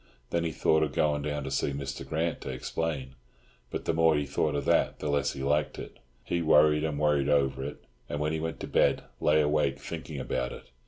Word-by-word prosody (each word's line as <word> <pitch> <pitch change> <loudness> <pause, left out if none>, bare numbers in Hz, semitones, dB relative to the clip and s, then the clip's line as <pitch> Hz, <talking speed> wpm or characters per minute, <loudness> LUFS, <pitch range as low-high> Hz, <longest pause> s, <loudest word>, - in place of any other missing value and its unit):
Then 85 0 +1
he 80 - -1
thought 80 +1 +2
of 80 - 0
going 75 -1 +1
down 75 -1 -2
to 65 - -5
see 70 +1 0
Mr. 70 0 -5
Grant 80 +4 -2
to - - -6
explain; 75 -6 -3 0.6
but - - -5
the - - +1
more 80 -1 +4
he 75 - 0
thought 75 +1 0
of 70 - -2
that - - +2
the 75 - -2
less 70 0 +1
he 65 - -6
liked 75 +1 +1
it. - - -9 0.2
He 85 - -1
worried 75 -1 +5
and 75 -2 -1
worried 75 -2 +2
over 70 -2 +2
it, - - -7 0.3
and 75 - -3
when 75 +1 0
he 80 - -1
went 80 +1 -4
to - - -4
bed - - +2 0.2
lay 75 +1 +4
awake 75 -2 +1
thinking 70 - -6
about 60 -1 -2
it. - - -12
75 Hz, 225 wpm, -29 LUFS, 70-80 Hz, 0.6 s, worried